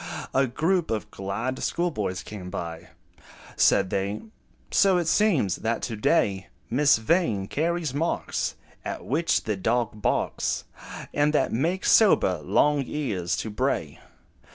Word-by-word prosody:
A 135 0 +3
group 165 +7 0
of 110 -2 -3
glad 105 +7 -4
schoolboys 110 - -2
came 95 -4 -8
by: 85 -1 -6 0.7
Said 95 -2 +3
they, 100 +2 -2 0.5
"So 195 -2 +4
it 175 -2 -1
seems, 165 - +2
that 115 +1 -2
to 115 - -3
day, 100 -2 +1 0.2
Miss 140 +2 +4
Vain 110 - +1
carries 165 - -1
marks 160 +4 -1 0.3
At - - -5
which 160 +6 +1
the 105 - -1
dog 110 +1 -1
barks, - - 0 0.5
And 150 +1 +2
that - - +2
make 165 +11 0
sober 95 - +5
Long 145 - +2
Ears 100 - -2
to 110 - -4
bray." 105 - -2
120 Hz, 130 wpm, -26 LUFS, 100-160 Hz, 0.7 s, sober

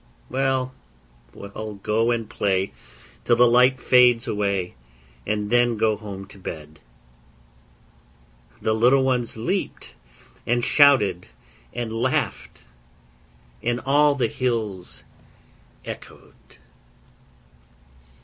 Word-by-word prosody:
'Well, 130 -1 0 0.6
well, 105 - -8
go 110 +3 0
and 115 -2 -1
play 95 -2 -1 0.5
till 120 - +3
the 120 +1 +5
light 125 +2 +4
fades 125 -1 +4
away, 100 -4 -1 0.5
And 105 0 -2
then 120 -1 +3
go 110 0 +2
home 100 -2 -8
to 100 - -15
bed.' 75 -3 -8 1.8
The 110 - +1
little 125 +5 +4
ones 125 -3 -1
leaped, 180 - -3 0.5
and 120 0 0
shouted, 105 - +4 0.4
and 115 -2 -5
laughed, 130 +2 -2 1.0
And 120 0 -1
all 145 +2 +3
the 125 -4 +1
hills 110 -8 -3 0.8
echoèd. - - -12
115 Hz, 95 wpm, -23 LUFS, 105-125 Hz, 1.8 s, the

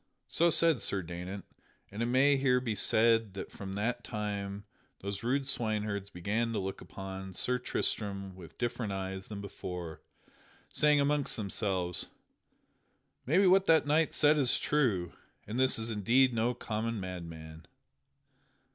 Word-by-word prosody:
(So 170 +1 +3
said 165 -4 +3
Sir 95 -2 -1
Daynant, 90 +3 -6 0.5
and 105 +3 -5
it 115 - +1
may 135 +3 +4
here 130 -2 +3
be 120 -3 -2
said 110 0 +3
that 95 - -6
from 95 -1 -7
that 115 +4 -2
time 100 -2 -4 0.4
those 100 0 -4
rude 135 +4 0
swineherds 105 -6 -2
began 105 +5 -1
to - - -1
look 95 0 -4
upon 95 -1 -7
Sir 125 +6 +1
Tristram 100 -5 -3
with 90 -3 -13
different 120 -3 -2
eyes 95 0 -5
than 105 -2 -6
before, 90 -4 -7 0.7
saying 150 -1 +4
amongst 145 0 +1
themselves: 95 -4 -2 1.2
"Maybe 180 +8 +4
what 190 +1 +5
that 160 -2 +5
knight 155 +1 +2
said 150 0 +4
is 130 -4 +4
true, 110 - 0 0.3
and 110 +5 -4
this 130 0 +5
is 115 0 -1
indeed 120 +5 +3
no 115 +2 +1
common 115 0 -3
madman.") 85 -3 -8
110 Hz, 145 wpm, -31 LUFS, 95-125 Hz, 1.2 s, what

